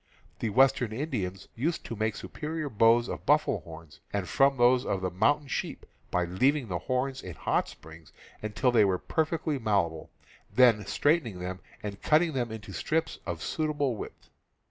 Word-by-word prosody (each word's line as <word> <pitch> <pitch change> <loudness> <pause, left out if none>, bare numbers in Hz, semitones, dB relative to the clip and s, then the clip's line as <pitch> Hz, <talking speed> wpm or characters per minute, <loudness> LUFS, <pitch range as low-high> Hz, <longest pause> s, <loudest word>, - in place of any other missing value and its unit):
The 115 - -1
western 125 0 +3
Indians 110 - -3
used 155 +8 -2
to 115 - -5
make 110 0 -1
superior 155 -1 -5
^.. - - -18
bows 115 +3 +5
of - - -5
buffalo 150 -7 +3
horns, 80 -2 -12
and 100 -3 -2
from 135 0 +3
those 125 +1 +5
T. - - -6
of 95 - 0
the 90 -1 -1
mountain 145 +10 +2
sheep, - - -4 0.2
by 90 0 +1
leaving 130 - +1
the 90 -2 -2
horns 130 +4 -2
in 90 -3 -8
hot - - 0
springs 80 -1 -14 0.3
until 110 +4 +1
they 115 -3 +5
were 95 -2 +2
perfectly 160 - -1
malleable, 100 -8 0 0.4
then 115 -5 +5
straightening 145 - +1
them 90 +1 -5 0.2
and 100 -1 -6
cutting 160 +1 +3
them 120 -4 -1
into 105 -3 -8
strips 160 +9 -1
of 85 -2 -4
suitable 145 -5 -1
width. - - -9
115 Hz, 175 wpm, -29 LUFS, 95-140 Hz, 0.4 s, bows